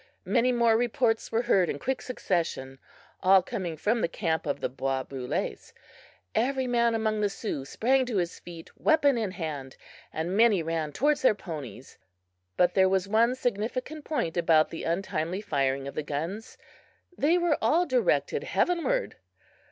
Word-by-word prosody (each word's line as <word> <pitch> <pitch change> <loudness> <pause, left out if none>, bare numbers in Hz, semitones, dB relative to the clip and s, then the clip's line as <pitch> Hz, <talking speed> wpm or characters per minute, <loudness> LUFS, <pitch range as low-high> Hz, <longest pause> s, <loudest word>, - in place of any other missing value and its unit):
Many 250 +2 +2
more 235 -2 +3
reports 240 -1 0
were 230 +1 +1
heard 190 -7 +3
in - - -2
quick 255 - -2
succession, 165 - -3 0.4
all 190 0 +6
coming 185 -7 -4
from 220 +8 0
the - - +2
camp 160 -6 -2
of 145 - -1
the - - -1
bois 135 0 -2
brules. 130 -1 -4 0.6
Every 265 +2 +1
man 235 -2 +2
among 215 -1 0
the 205 - +2
Sioux 195 - -4
sprang 255 - +1
to 230 -5 -1
his 175 -2 -2
feet, 170 -2 -11
weapon 295 -4 +3
in 220 -4 -1
hand, 155 -8 -6 0.3
and 170 +4 -3
many 215 -5 +4
ran 160 -2 -2
towards 290 - +1
their 255 - +4
ponies. 150 - -9 0.6
But 180 0 +3
there 190 -1 +4
was 190 0 +1
one 230 +4 +3
significant 250 +5 -3
point 225 - -2
about 165 -2 +3
the 165 - -6
untimely 170 0 -2
firing 140 -8 -1
of 140 - -6
the - - -2
guns 165 +9 -5 0.6
they 325 +4 +3
were 345 -4 +1
all 345 +3 +3
directed - - +1
heavenward! 360 +9 0
200 Hz, 160 wpm, -27 LUFS, 160-245 Hz, 0.6 s, all